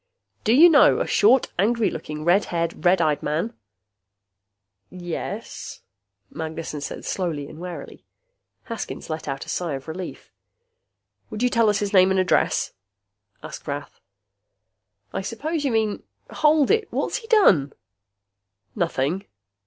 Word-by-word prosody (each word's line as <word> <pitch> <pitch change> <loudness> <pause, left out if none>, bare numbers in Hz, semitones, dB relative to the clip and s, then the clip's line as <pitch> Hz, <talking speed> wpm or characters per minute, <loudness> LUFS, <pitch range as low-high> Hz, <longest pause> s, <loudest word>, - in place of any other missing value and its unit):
Do - - +2
you 310 +7 +9
know 310 -4 +6
a - - 0
short, 270 - +3
angry 225 +2 +2
looking, 150 0 -6
red 180 +4 +4
haired, 170 -1 -3
red 180 0 +4
eyed 150 -2 +1
man?" 165 +10 -2 1.4
"Yes," 175 -2 -6 0.5
Magnessen 160 -2 -5
said - - -6
slowly 160 -7 -2
and 155 - -12
warily. 180 0 -8 0.6
Haskins 230 -7 -6
let 155 0 -5
out 135 -1 -4
a - - -11
sigh 170 -5 -2
of 135 +2 -9
relief. 175 +3 -7 1.0
"Would 215 - -4
you 250 - +4
tell 230 -2 +3
us 205 - +2
his 205 0 -2
name 185 -1 +6
and 190 0 +2
address?" 185 - +1 0.7
asked - - -9
Rath. - - -6 1.1
"I - - -2
suppose 295 - -3
you 270 - +1
mean 220 -2 0 0.3
hold 300 -2 +3
it! 445 0 +1
What's - - -1
he 465 -3 -10
done?" 195 - +4 1.0
"Nothing." 175 0 -1
185 Hz, 135 wpm, -23 LUFS, 160-235 Hz, 1.4 s, you